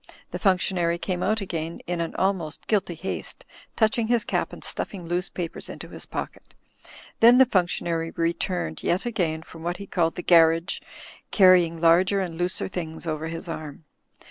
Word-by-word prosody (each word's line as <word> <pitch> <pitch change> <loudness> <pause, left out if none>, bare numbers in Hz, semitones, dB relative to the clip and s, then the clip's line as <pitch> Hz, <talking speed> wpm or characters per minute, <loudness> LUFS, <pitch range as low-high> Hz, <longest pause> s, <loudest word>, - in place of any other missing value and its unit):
The - - -4
functionary 180 -3 +2
came 180 0 -3
out 215 +2 +1
again 165 -3 -4
in 175 -1 -2
an 165 - -4
almost 185 -5 -1
guilty 195 -5 0
haste, 190 +4 -5 0.3
touching 220 0 +2
his 235 -1 +2
cap - - -1
and - - -10
stuffing 185 -4 -3
loose 175 +2 -1
papers 170 -3 -6
into - - -8
his - - -7
pocket. - - -7 0.6
Then 235 +2 +8
the 265 - +9
f 255 - -26
imctionary 170 -3 0
returned 165 - -1
yet 180 +5 0
again 170 -9 -1
from 165 - -13
what 175 +2 -2
he 200 - -8
called 170 -4 0
the 180 - -5
"garrige," 165 +1 +4 0.5
carrying 180 -4 +5
larger 175 +4 +4
and 180 -4 -3
looser 175 +2 -1
things 165 -3 -5
over 155 0 -3
his 165 +1 -6
arm. 155 -2 -7
175 Hz, 170 wpm, -25 LUFS, 165-190 Hz, 0.6 s, the